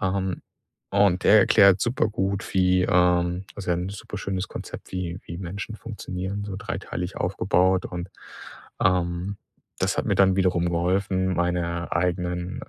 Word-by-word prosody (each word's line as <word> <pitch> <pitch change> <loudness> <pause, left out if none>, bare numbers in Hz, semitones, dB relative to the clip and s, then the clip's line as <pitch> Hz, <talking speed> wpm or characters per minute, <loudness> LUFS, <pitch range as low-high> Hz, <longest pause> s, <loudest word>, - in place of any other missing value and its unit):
Ähm, 95 -1 -1 0.5
und 100 -2 +3
der 110 - +7
erklärt 100 -1 +6
super 120 -1 +1
gut, 100 -2 -2
wie, 90 -1 +3
ähm 90 +1 +2
also, 95 -3 -4
ja - - +1
'n 90 +2 -3
super 105 +1 -8
schönes 95 -1 -3
Konzept, - - -8
wie 90 -1 -4
wie 85 - -6
Menschen 100 +4 -6
funktionieren, 100 -2 -5
so 100 -2 -5
dreiteilig 90 -3 -5
aufgebaut. 95 0 +2
Und, 90 +1 -6 0.7
ähm, 90 +2 0 0.4
das - - 0
hat - - 0
mir - - +2
dann 95 -1 +4
wiederum 90 -2 +2
geholfen, 95 +2 0
meine 85 0 -1
eigenen 90 +1 -1
90 Hz, 145 wpm, -25 LUFS, 90-100 Hz, 0.7 s, der